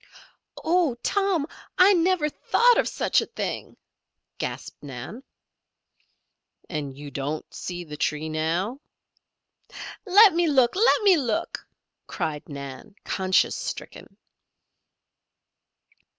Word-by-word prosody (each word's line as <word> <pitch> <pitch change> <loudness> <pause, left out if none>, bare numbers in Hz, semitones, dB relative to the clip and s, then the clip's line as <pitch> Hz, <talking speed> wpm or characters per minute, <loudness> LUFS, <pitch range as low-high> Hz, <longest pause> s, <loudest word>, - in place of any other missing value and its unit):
"Oh, 330 -6 +2
Tom! 390 -7 +1 0.3
I 380 +2 +7
never 350 -3 +2
thought 480 +10 +3
of - - +1
such - - +1
a - - -5
thing," - - -5 0.6
gasped - - -5
Nan. 140 - -8 1.5
"And 145 -5 -5
you 145 0 -9
don't 145 +3 -3
see 175 -1 -5
the 150 -3 -9
tree 150 +1 -1
now?" 165 - -1 1.3
"Let 405 +1 +8
me 340 0 +2
look! 265 -3 +3
Let 445 +2 +4
me 390 -4 +6
look!" 240 -7 -2 0.4
cried 160 -4 -4
Nan, 140 +8 -8
conscience 185 -1 +1
stricken. - - -7
215 Hz, 105 wpm, -25 LUFS, -, 1.5 s, Let